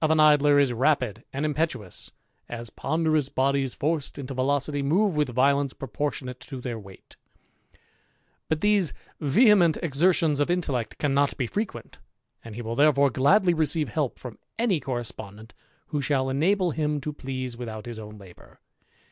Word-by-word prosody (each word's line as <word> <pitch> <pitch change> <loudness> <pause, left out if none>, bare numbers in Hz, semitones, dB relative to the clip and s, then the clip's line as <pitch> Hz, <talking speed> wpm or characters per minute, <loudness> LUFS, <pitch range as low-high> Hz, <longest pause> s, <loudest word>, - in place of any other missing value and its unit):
279 155 0 +5
in 150 - +8 0.2
Idler 145 - +6
is 135 -3 +3
rapid 125 -4 +1
and 140 +3 -2
impetuous, 150 - -3 0.4
as 115 -2 -6
ponderous 155 -3 0
bodies 135 -1 0
ed 150 -1 -1
into 135 -1 -6
velocity 140 +2 0
move 180 +7 +2
with 150 -3 +1
violence 140 +2 +2
proportionate 135 -2 -4
to 130 +1 -8
r 115 -2 -4
weight 95 -2 -15 1.3
ut 160 - +1
these 205 -7 +2 0.3
vehement 175 - +4
exertions 160 -1 +2
of 145 - +1
intellect 140 -11 -1
cannot 140 -1 +1
be 125 - -1
ient, 195 - -5 0.4
and 115 -2 -9
he 120 - -6
will 115 +1 -4
therefore 140 +1 +4
gladly 175 - +4
receive 155 -1 0
help 150 -5 -2
from 125 -3 -9 0.4
correspondent 110 -4 -6 0.4
who 150 -2 -1
shall 130 -1 0
enable 180 +6 +2
him 150 -1 -1
to 150 +2 -5
please 130 -3 -5
without 115 -2 -7
own 105 0 -9
labour. 95 -3 -16
140 Hz, 150 wpm, -26 LUFS, 125-155 Hz, 1.3 s, in